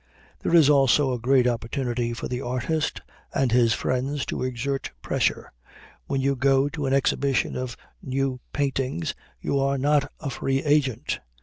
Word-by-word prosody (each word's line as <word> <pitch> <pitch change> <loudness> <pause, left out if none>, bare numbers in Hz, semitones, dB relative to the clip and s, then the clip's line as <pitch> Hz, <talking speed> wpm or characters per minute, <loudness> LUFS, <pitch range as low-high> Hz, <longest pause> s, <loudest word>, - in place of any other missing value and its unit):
There 170 - +1
is 160 -4 +7
also 135 -1 +4
a 125 - -3
great 125 +1 +3
opportunity 120 0 -1
for 115 - -4
the 125 0 -3
artist 130 +6 -1 0.3
and 130 -3 +2
his 120 -2 +4
friends 130 +4 -1
to - - -4
exert 130 +2 -2
pressure. - - 0 0.6
When 135 - 0
you 140 +1 +1
go 135 +1 +3
to 145 -2 -3
an 135 - +1
exhibition 140 0 +1
of 125 -1 -4 0.2
new 135 -1 -1
paintings, 135 - -1 0.3
you 140 - 0
are 135 0 +1
not 145 +1 +2
a 140 -3 -4
free 135 +1 -1
agent. 145 -3 +1
135 Hz, 160 wpm, -25 LUFS, 125-140 Hz, 0.6 s, is